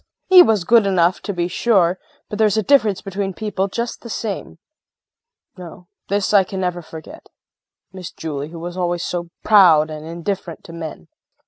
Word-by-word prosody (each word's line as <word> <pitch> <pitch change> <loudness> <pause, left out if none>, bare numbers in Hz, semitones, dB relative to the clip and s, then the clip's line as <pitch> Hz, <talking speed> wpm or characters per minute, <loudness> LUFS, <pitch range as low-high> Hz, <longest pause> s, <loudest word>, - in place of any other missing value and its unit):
He 370 -1 +9
was 220 - +3
good 225 +2 +4
enough, 180 -2 +2
to 205 - -4
be 175 -2 -2
sure, 185 -2 +1 0.3
but 210 - -7
there's 215 -1 +3
a 220 - +1
difference 215 -7 +2
between 195 -1 -4
people 205 -3 -2
just 235 +4 -5
the 235 - -10
same. 210 -5 -5 1.0
No, 180 0 -12 0.2
this 200 +1 -1
I 200 -2 +6
can 190 +1 -6
never 180 -1 -2
forget. 160 -1 -12 0.6
Miss 185 -2 -8
Julie 150 -2 -6
who 170 - -10
was 175 +2 -7
always 175 -1 -2
so 175 -1 -4 0.2
proud 165 -7 +5
and 155 0 -7
indifferent 170 +1 -5
to 165 - -12
men! 160 -2 -8
185 Hz, 175 wpm, -19 LUFS, 170-205 Hz, 1.0 s, He